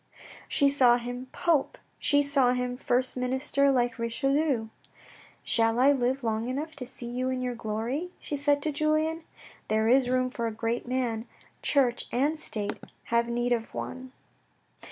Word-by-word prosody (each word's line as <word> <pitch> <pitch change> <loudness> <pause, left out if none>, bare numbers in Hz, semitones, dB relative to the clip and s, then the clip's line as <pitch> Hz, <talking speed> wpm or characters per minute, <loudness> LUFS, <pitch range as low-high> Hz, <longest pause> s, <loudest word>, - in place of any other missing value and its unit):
She 285 - +4
saw 255 -4 +5
him 245 +1 -6
Pope; 325 -5 0 0.2
she 285 0 +4
saw 275 -3 +3
him 250 0 -2
first 250 0 0
minister 265 +2 +1
like 245 -3 0
Richelieu. 270 0 0 0.4
" - - -21 0.3
Shall 225 0 +3
I 270 +3 +6
live 260 0 0
long 225 +1 -1
enough 305 +5 -4
to 250 -3 -6
see 240 - -8
you 250 +2 -2
in 255 0 -2
your 250 -1 -2
glory? 235 +9 -3
" - - -36
she 295 - -4
said 285 0 +1
to 310 - 0
Julien. 310 +2 0 0.2
" - - -22
There 220 0 +1
is 250 +1 +4
room 255 0 +1
for 235 -2 -2
a - - -2
great 230 +2 -3
man; 240 -3 -2 0.3
church 255 -4 +1
and 290 +5 +1
state 210 -8 -2 0.3
have 235 0 +3
need 240 +1 -1
of 230 -1 -4
one.' 255 0 -6
255 Hz, 175 wpm, -28 LUFS, 235-280 Hz, 0.4 s, I